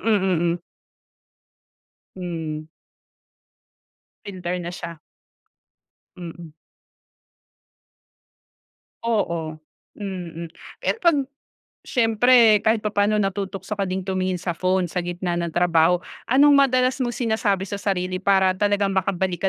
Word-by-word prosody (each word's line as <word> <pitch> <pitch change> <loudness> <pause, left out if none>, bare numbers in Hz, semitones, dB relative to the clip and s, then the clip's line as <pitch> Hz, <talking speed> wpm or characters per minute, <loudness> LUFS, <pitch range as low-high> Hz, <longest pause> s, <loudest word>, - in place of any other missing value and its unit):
mm. 185 -6 +2 1.6
Hmm. 160 -4 -4 1.6
Filter 180 -3 -4
na 175 0 -5
siya. 170 -2 -7 1.2
Mm. 170 -2 -9 2.5
Oo. 170 -9 -1 0.4
Mm. 175 -5 -6 0.3
Pero - - -1
'pag 340 -3 +5 0.7
syempre 225 -2 +4
kahit 220 +1 +2
papaano 205 0 +2
natutukso 195 0 -3
ka 200 - -1
ding 185 +1 -2
tumingin 185 -1 -1
sa 175 0 -2
phone 185 +1 +1
sa 180 - -1
gitna 175 0 -3
ng 170 -1 -2
trabaho. 175 0 +3 0.3
Anong 285 +4 +6
madalas 255 -1 +3
mong 240 -2 -1
sinasabi 220 -5 0
sa 200 - -4
sarili 185 -2 -1
para 190 -1 +3
talagang 205 0 +1
makabalik 190 -2 -1
190 Hz, 100 wpm, -23 LUFS, 175-210 Hz, 2.5 s, Anong